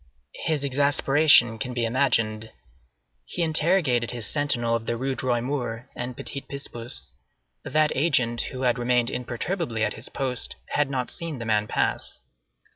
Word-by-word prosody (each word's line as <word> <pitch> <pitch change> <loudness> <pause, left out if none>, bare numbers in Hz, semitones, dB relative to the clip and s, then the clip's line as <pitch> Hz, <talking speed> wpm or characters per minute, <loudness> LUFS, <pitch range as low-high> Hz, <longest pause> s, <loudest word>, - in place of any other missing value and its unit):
His 155 -4 0
exasperation 140 -3 +4
can 125 +2 -4
be 120 -2 0
imagined. 115 -3 +1 0.7
He 170 - -3
interrogated 155 -7 +2
his 120 -3 0
sentinel 120 -4 +2
of 115 -1 -4
the 120 - -1
Rues 130 +2 -2
Droit 120 -2 0
Mur 125 -2 -4
and 125 0 -5
Petit 140 - -4
Picpus; 125 -4 -7 0.5
that 155 0 +2
agent, 125 -6 +3
who 130 0 -6
had 125 0 +2
remained 120 -1 +1
imperturbably 125 - -3
at - - 0
his 110 - -10
post, 130 -3 -2
had 145 -2 +1
not 130 -2 -2
seen 165 -4 -5
the 115 - -6
man 105 -1 +1
pass. - - +2
125 Hz, 150 wpm, -25 LUFS, 115-145 Hz, 0.7 s, exasperation